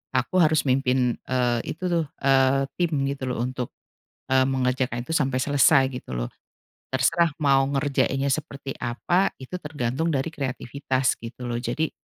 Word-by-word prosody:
aku 130 +8 0
harus 155 0 +3
mimpin, 130 -2 +2
eee, 125 -2 +1 0.2
itu 180 +3 -6
tuh, 170 -2 +1 0.2
eee, 135 0 +4
tim 175 -2 +1 0.2
gitu 140 -1 -5
loh 120 - -3
untuk, 125 -1 -4 0.6
eee, 130 0 +5
mengerjakan 130 -2 0
itu - - -6
sampai 135 -4 +1
selesai 140 -1 +5 0.2
gitu - - -9
loh, - - -2 0.6
terserah 165 +5 +3
mau 135 -1 +5
ngerjainnya 140 -1 0
seperti 140 -2 -4
apa, 175 +11 0
itu 135 +8 -6
tergantung 145 +1 -2
dari 135 +4 -1
kreativitas 135 -2 -1
gitu 120 +2 -8
loh, 120 - -2
jadi 150 +7 -1
135 Hz, 150 wpm, -25 LUFS, 125-145 Hz, 0.6 s, eee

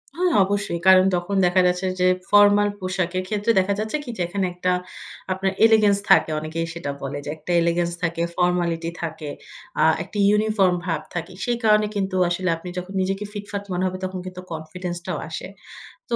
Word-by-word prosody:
হ্যাঁ, 360 0 +1
অবশ্যই। 200 -3 -2
কারণ 185 0 +7
তখন 180 +3 -2
দেখা 180 +1 +4
যাচ্ছে 180 +1 0
যে 180 - +4 0.2
ফরমাল 205 0 +6
পোশাকের 185 -1 -2
ক্ষেত্রে 210 +2 +1
দেখা 195 +2 +1
যাচ্ছে 220 +6 -1
কি? 250 - -9
যে - - -3
এখানে 190 +1 -1
একটা 180 +1 -1 0.6
আপনার 190 +1 0
এলিগেন্স 215 -3 +5
থাকে - - +6
অনেকেই 155 +2 -3
সেটা 170 -4 -4
বলে 140 +1 -4
যে - - -5
একটা 155 +3 -6
এলিগেন্স 170 0 +1
থাকে, 170 0 -1 0.2
ফর্মালিটি 175 -2 +1
থাকে, 160 -2 -5 0.5
আ - - +4 0.2
একটা 205 - -9
ইউনিফর্ম 210 -3 +3
ভাব 165 -4 -1
থাকে। 170 -1 -4
সেই 240 -1 0
কারণে 210 -1 +4
কিন্তু 195 -1 -1
আসলে 185 +1 -1
আপনি 180 +2 -8
যখন 180 +2 -5
নিজেকে 195 +2 -2
ফিটফাট 205 -1 -5
মনে 180 - -1
হবে 185 - -4
তখন 185 0 -4
কিন্তু 185 0 -7
কনফিডেন্সটাও 175 +2 -5
আসে। - - -6 0.6
তো 235 - +1
185 Hz, 180 wpm, -23 LUFS, 175-205 Hz, 0.6 s, কারণ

